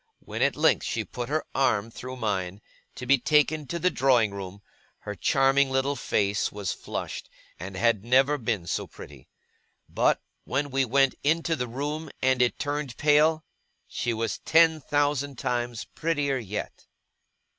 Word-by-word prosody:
When - - -7
at - - +3
length - - +3
she - - -2
put 120 0 -6
her 155 +1 -1
arm 115 -5 +1
through 130 +3 -7
mine, 100 -5 -2 0.4
to 125 - -7
be 140 +1 +4
taken 150 +1 +2
to 170 - -3
the 180 +2 +1
drawing 125 -6 +3
room, 100 +1 -8 0.4
her 105 - -5
charming 135 +7 +3
little 135 +2 0
face 100 -6 0
was 100 -2 -3
flushed, - - -6 0.3
and 95 +1 -7
had 110 -1 +2
never 135 +5 +3
been 105 -6 -2
so - - -2
pretty. 70 -4 -13 0.6
But, - - +2 0.2
when 145 0 -2
we 135 0 +2
went 135 +2 +3
into 165 +2 +1
the 125 -4 -3
room, 145 +6 -4
and 130 -1 +2
it 125 - +2
turned 145 -4 -3
pale, 155 +1 +3 0.4
she 120 - -2
was 115 0 -2
ten 160 -1 +4
thousand 145 -1 0
times 120 -2 -2
prettier 145 -5 -1
yet. 105 -2 -6
130 Hz, 155 wpm, -26 LUFS, 115-145 Hz, 0.6 s, be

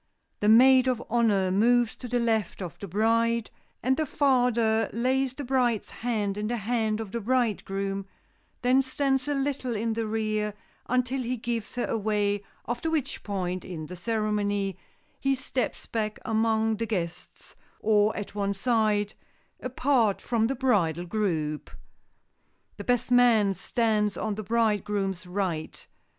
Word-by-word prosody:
The 210 - +2
maid 255 +3 +7
of 250 -2 0
honor 210 -6 +3
moves 235 +4 +3
to 250 - -7
the 245 +1 0
left 225 -5 0
of 180 -4 -6
the 200 - -6
bride, 230 +4 +1 0.3
and 260 +1 +2
the 310 - 0
father 245 -6 +2
lays 260 +3 0
the 290 - -5
bride's 245 -4 0
hand 210 -4 -1
in 210 - -2
the 240 +2 -1
hand 220 0 0
of 220 -3 -5
the 235 - -3
bridegroom, 200 -5 -1 0.6
then 255 +2 +5
stands 270 0 0
a 290 - 0
little 270 -3 -1
in 225 +2 -1
the 225 0 -2
rear 215 -1 -1 0.3
until 250 +1 0
he 250 +1 -2
gives 230 -1 -4
her 245 - 0
away, 205 -2 0 0.3
after 240 +7 -2
which 295 -4 -2
point 185 -3 -3
in 160 -4 -6
the 180 - -8
ceremony 205 -1 -1 0.4
he 275 0 +1
steps 260 -2 -3
back 215 -2 -2
among 220 -1 +1
the 230 +1 -2
guests, 175 -6 -5 0.2
or 210 0 +3
at 205 - -5
one 200 -1 -1
side, 215 -2 +1 0.5
apart 255 -4 +1
from 225 -2 +1
the 270 - -1
bridal 185 - +1
group. 165 -7 -2 1.1
The - - -6
best 245 0 0
man 235 -5 +5
stands 210 +1 0
on 215 -1 -2
the 215 - -4
bridegroom's 205 -4 0
right. 180 -4 -3
220 Hz, 150 wpm, -27 LUFS, 205-245 Hz, 1.1 s, maid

